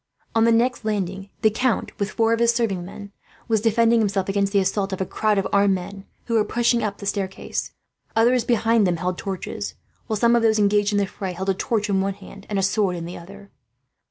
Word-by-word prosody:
On 225 0 +3
the 230 - +4
next 240 +2 +2
landing 195 -2 -3
the 220 - +5
count, 240 +2 0
with 200 0 -1
four 225 0 +2
serving 230 -6 +1
men, 200 +2 -10 0.4
was 220 -2 +1
defending 230 +1 +3
himself 195 -3 0
against 200 0 0
the 200 - +2
assault 195 +1 0
of 190 - -3
a 190 - 0
crowd 215 +2 0
of 195 - +1
armed 200 -1 +4
men, 195 +2 -7 0.2
who 230 - -3
were 220 -2 +4
pushing 240 +1 +1
up 205 -2 -2
the 200 - -9
staircase. 195 -1 -3 0.4
Others 240 +2 +4
behind 230 -3 +2
them 175 -1 0
held 180 +1 -3
torches, 195 -3 -5 0.3
while 220 - -1
some 235 +2 +4
of 235 - +3
those 220 -1 +3
engaged 205 0 +3
in 205 - +1
the 200 - +2
fray 190 -1 -5
held 190 +2 -4
a - - +4
torch 210 +2 -1
in 195 -2 +1
one 195 0 -1
hand, 200 0 -13
and 205 - -1
a 195 - +1
sword 195 -1 +1
in 170 -1 -5
the 175 - -7
other. 200 +3 -12
205 Hz, 225 wpm, -23 LUFS, 195-225 Hz, 0.4 s, the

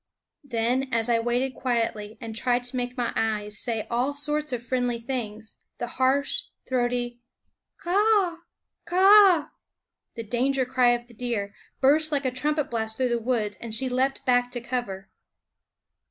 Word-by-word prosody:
Then, 255 +1 0
as 230 0 +1
I 230 -1 +3
waited 245 +3 0
quietly 225 -4 -2
and 225 -2 -7
tried 245 +1 +1
to 245 +1 -3
make 245 +1 -3
my 240 -1 -1
eyes 210 -1 -1
say 225 -3 -2
all 250 +5 -1
sorts 300 0 0
of 245 -2 -3
friendly 245 -1 -1
things, 225 -3 -5 0.2
the - - -3
harsh, 265 - 0 0.2
throaty 245 -1 -1 0.6
K 345 - -3
a - - +1
a - - +3
a 410 -4 +3
h! 335 - -16 0.5
k 350 - -3
a - - +4
a - - +4
a 390 -3 +8
h! - - -14 0.7
the 230 - -5
danger 255 +4 0
cry 250 -1 +3
of 240 0 -3
the 240 - -17
deer, 220 -4 -3 0.3
burst 305 +4 +4
like 285 -2 0
a 260 - +1
trumpet 295 +3 -1
blast 220 -1 -2
through 255 -1 +1
the 235 0 0
woods, 220 -4 -1
and 225 -2 -3
she 260 +3 +1
leaped 265 +2 0
back 245 -1 +3
to 245 - -2
cover. 235 -6 -4
245 Hz, 185 wpm, -26 LUFS, 230-270 Hz, 0.7 s, a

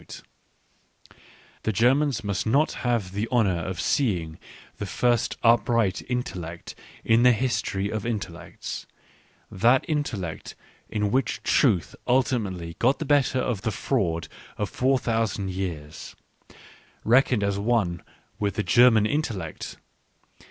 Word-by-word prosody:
* - - -21 1.5
The 110 - 0
Germans 125 +4 +2
must 100 +1 -2
not 140 +7 +3
have 115 -7 0
the 105 +4 -2
honour 100 -8 +2
of 90 0 -5
seeing 90 - 0 0.4
the - - -4
first 120 -2 +1
upright 115 -3 +3
intellect 90 -9 -4 0.3
in 115 +1 +4
their 125 0 +7
history 105 -4 -1
of 110 -2 -3
intellects, 115 -3 -5 0.6
that 120 +7 +3
intellect 115 - -3 0.3
in 105 -1 -1
which 135 +3 0
truth 100 - +2
ultimately 105 -10 0
got 130 +4 +3
the 160 - -4
better 140 -2 +2
of 115 -7 -2
the 110 - -1
fraud 90 -9 -1 0.3
of 105 -5 -3
four 130 +1 +2
thousand 110 -5 -1
years, 85 -6 -6 0.9
reckoned 125 -2 +3
as 100 0 0
one 100 -6 0 0.4
with 100 -2 -1
the 105 - -1
German 120 -3 +5
intellect. 110 - -3
110 Hz, 125 wpm, -25 LUFS, 95-125 Hz, 1.5 s, their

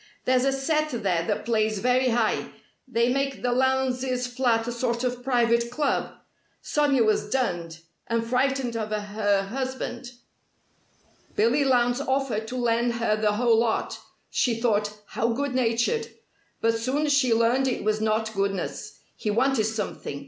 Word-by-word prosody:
There's 255 0 +3
a 275 - +3
set 305 +3 0
there 190 - -1
that 210 - -2
plays 215 -2 +1
very 250 +4 +2
high. 230 -2 +1 0.4
They 240 0 +1
make 275 0 -2
the 245 - +1
Lowndes' 255 0 +1
flat 245 -2 0
a - - -1
sort 235 0 -2
of 245 -1 -2
private 235 -2 +2
club. 285 +3 -1 0.5
Sonia 285 -5 +2
was 215 -1 +1
dunned 175 -10 -2 0.3
and 230 0 0
frightened 255 0 0
of 220 -1 -3
her 205 -1 0
husband. 255 +2 -5 1.2
Billy 235 +7 +3
Lowndes 245 -1 +2
offered 265 -5 -1
to 250 +2 -5
lend 235 0 +1
her 230 -2 +1
the 215 -1 +1
whole 230 +1 +3
lot. 230 -1 -1 0.3
She 235 -3 +1
thought, 210 -3 +1 0.2
how 230 - 0
good 280 +2 -2
natured! 255 - +1 0.5
But 225 0 +2
soon 270 +6 0
she 280 -4 +3
learned 235 +4 +3
it 255 - -2
was 215 0 0
not 220 0 0
goodness. 195 -1 -3
He 215 - -3
wanted 245 +1 +2
something. 210 -9 -4
240 Hz, 150 wpm, -25 LUFS, 220-260 Hz, 1.2 s, There's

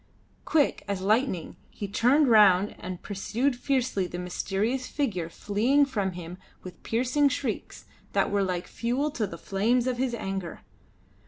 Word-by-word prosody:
Quick 300 -3 +2
as 200 -2 -2
lightning 210 - 0
he 205 - -6
turned 255 +9 +3
round 205 -4 +5
and 180 0 -7
pursued 235 +7 -1
fiercely 250 -7 0
the 175 - -6
mysterious 200 +8 -2
figure 195 - -2
fleeing 230 - +2
from 205 -8 -2
him 175 +1 -8 0.2
with 185 - -10
piercing 255 +5 +2
shrieks - - -4 0.3
that - - +2
were 200 0 +2
like 180 -2 -1
fuel 255 +6 -1
to 220 -6 -2
the - - -8
flames 230 +5 +1
of 250 -1 -1
his 255 -2 0
anger. 195 -5 -5
215 Hz, 150 wpm, -27 LUFS, 190-255 Hz, 0.3 s, round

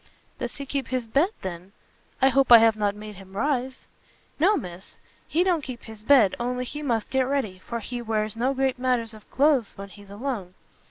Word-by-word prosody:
"Does 240 - -4
he 280 - -6
keep 275 0 -3
his 255 -2 -2
bed, 280 - +2
then? 185 +1 -7 0.5
I 265 - +7
hope 270 -1 +2
I 235 - +13
have 225 -1 +5
not 205 -1 0
made 210 -1 -9
him 195 0 -12
rise?" 260 0 -1 0.5
"No, 390 +7 +4
Miss, 180 +1 -9 0.3
he 335 +3 +2
don't 355 -4 +1
keep 255 -3 -7
his 220 -1 -11
bed, 235 -6 +5
only 250 +1 -2
he 295 +4 -6
must 235 -7 -1
get 265 - +2
ready, 260 -10 -2
for 235 -1 -3
he 240 +3 -5
wears 220 -1 -1
no 255 +4 0
great 265 -1 0
matters 245 -3 0
of 215 -1 -15
cloaths 275 -6 +2
when 200 0 -8
he's 200 +1 -15
alone. 205 -4 -5
240 Hz, 205 wpm, -25 LUFS, 210-270 Hz, 0.5 s, I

